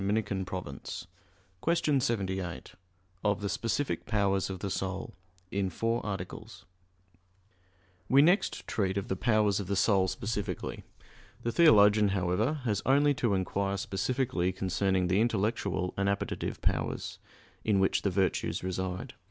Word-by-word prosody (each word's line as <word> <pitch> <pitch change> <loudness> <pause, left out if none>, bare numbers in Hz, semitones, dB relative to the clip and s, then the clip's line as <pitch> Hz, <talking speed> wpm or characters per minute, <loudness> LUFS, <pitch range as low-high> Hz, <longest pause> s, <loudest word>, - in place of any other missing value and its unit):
ii, 95 - -2 0.2
24). 95 -2 -3 0.2
_______________________ 70 +5 -7 0.5
QUESTION 160 -5 +2
78 95 - -2 0.5
OF 105 -1 +2
THE 100 - -2
SPECIFIC 115 +7 -1
POWERS 100 -3 +1
OF 95 - -4
THE 100 +1 -4
SOUL 95 0 -3 0.4
(In 95 -1 0
Four 115 +6 -1
Articles) 95 -3 -6 1.4
We 140 +2 +7
next 180 +6 +2
treat 95 -2 -1
of 100 - -3
the 95 - 0
powers 105 -1 +2
of 100 - -4
the 100 - 0
soul 100 -1 +3
specifically. 100 -2 -3 0.6
The 120 - 0
theologian, 105 -8 +6
however, 105 - 0
has 105 -5 0
only 145 +2 +4
to 115 -6 +1
inquire 100 +1 -1
specifically 100 -2 -1
concerning 95 0 0
the 95 +4 +2
intellectual 100 -4 0
and 100 0 +1
appetitive 100 0 -3
powers, - - -2 0.4
in 105 -3 +2
which 95 - +2
the 100 - +1
virtues 95 -1 0
reside. 95 0 -3
100 Hz, 135 wpm, -30 LUFS, 95-115 Hz, 1.4 s, We